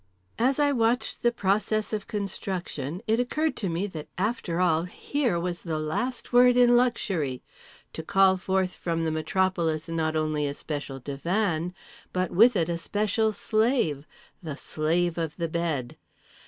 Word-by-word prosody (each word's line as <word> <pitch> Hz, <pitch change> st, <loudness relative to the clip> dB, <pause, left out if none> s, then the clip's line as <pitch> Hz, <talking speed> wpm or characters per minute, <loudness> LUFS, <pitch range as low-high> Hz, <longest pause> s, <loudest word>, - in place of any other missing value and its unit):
As 255 Hz, +3 st, +3 dB
I 290 Hz, -1 st, +3 dB
watched 235 Hz, -1 st, 0 dB
the 240 Hz, -, +3 dB
process 215 Hz, 0 st, 0 dB
of 210 Hz, -2 st, -3 dB
construction 185 Hz, -, -4 dB
it 225 Hz, +1 st, +2 dB
occurred 305 Hz, +6 st, 0 dB
to 195 Hz, -, -2 dB
me 170 Hz, +4 st, -1 dB
that 160 Hz, -7 st, -7 dB
after 195 Hz, -4 st, -1 dB
all 165 Hz, -3 st, +3 dB
here 240 Hz, +1 st, -1 dB
was 175 Hz, 0 st, -3 dB
the 160 Hz, -3 st, -3 dB
last 240 Hz, +14 st, -3 dB
word 245 Hz, 0 st, +6 dB
in 245 Hz, -1 st, +6 dB
luxury—to 175 Hz, -, -2 dB
call 190 Hz, +3 st, +4 dB
forth 190 Hz, 0 st, 0 dB
from 165 Hz, -1 st, -2 dB
the 160 Hz, -, 0 dB
metropolis 165 Hz, -1 st, 0 dB
not 160 Hz, -1 st, -1 dB
only 155 Hz, -1 st, 0 dB
a 140 Hz, -, -4 dB
special 145 Hz, -3 st, -5 dB
divan 170 Hz, -, -1 dB, 0.4 s
but 185 Hz, -1 st, -1 dB
with 230 Hz, +6 st, +6 dB
it 165 Hz, -4 st, +2 dB
a 170 Hz, -1 st, -2 dB
special 215 Hz, +4 st, 0 dB
slave, 215 Hz, -, 0 dB, 0.3 s
the 155 Hz, -5 st, -6 dB
Slave 170 Hz, +3 st, 0 dB
of 160 Hz, -2 st, -3 dB
the 170 Hz, -2 st, -1 dB
Bed…. 160 Hz, -7 st, -2 dB
180 Hz, 155 wpm, -27 LUFS, 160-220 Hz, 0.4 s, word